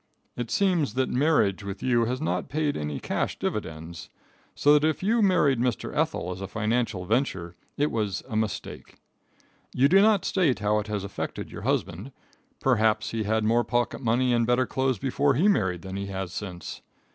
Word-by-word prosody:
It 120 -2 -4
seems 175 - +1
that 130 0 +1
marriage 125 -8 +2
with 100 0 -6
you 120 -2 +2
has 125 +3 -2
not 155 - -2
paid 150 +1 0
any 75 -2 -3
cash - - -2
dividends. 80 0 -5 0.5
So 145 - +4
that 150 0 +4
if 155 - -4
you 225 +4 +2
married 150 - +3
Mr. 125 -2 -1
Ethel 90 +2 -1
as 90 +1 -7
a 95 - -4
financial 110 -2 -1
venture, 95 -7 -1 0.2
it 145 +1 +1
was 105 -4 -2
a 115 - -6
mistake. 110 -2 -4 0.8
You 135 +2 +5
do 195 +6 +6
not 210 -2 +4
state 170 -9 +2
how 105 +1 +1
it 105 - -5
has 105 -2 -3
affected 100 - -5
your - - -8
husband. 95 +11 -2 0.5
Perhaps 110 -4 +2
he 110 -2 -2
had 110 +1 +1
more 115 +2 +3
pocket 120 +3 -1
money 125 +1 +2
and 115 -1 +2
better 125 +1 +3
clothes 130 -1 0
before 140 +1 +1
he 170 +10 +3
married 95 - +1
than 95 0 -6
he 100 0 -4
has 95 -2 -5
since. 90 -4 -6
115 Hz, 185 wpm, -26 LUFS, 100-140 Hz, 0.8 s, do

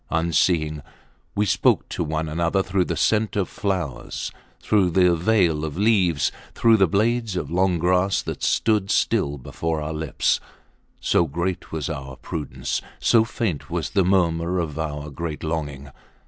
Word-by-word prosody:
Unseeing, 80 -1 +1 0.5
we 105 - +2
spoke - - +2
to - - -3
one 80 0 -2
another 85 +5 0
through 95 -1 0
the - - -3
scent 110 -1 +1
of 100 -3 +1
flowers, 90 - -3 0.3
through 100 -4 +2
the 90 0 +4
veil 85 -4 +2
of 80 0 -4
leaves, 95 -9 +2 0.2
through 115 -1 +5
the 95 -3 +4
blades 110 +3 +1
of 90 - -3
long 90 0 +2
grass 90 +3 +2
that - - -5
stood 105 -3 +1
still 70 0 +1
before 80 +5 -3
our 75 +1 -4
lips; 80 -1 0 0.6
so 85 - +2
great 85 +5 -3
was 80 -3 -3
our 65 -1 -5
prudence, 75 +2 -4 0.2
so 115 -2 +4
faint 110 - -3
was - - -2
the 100 -2 +3
murmur 85 -1 +1
of 80 -3 -3
our 75 -1 -4
great 80 +2 -5
longing. 75 -3 -4
85 Hz, 155 wpm, -23 LUFS, 75-95 Hz, 0.6 s, through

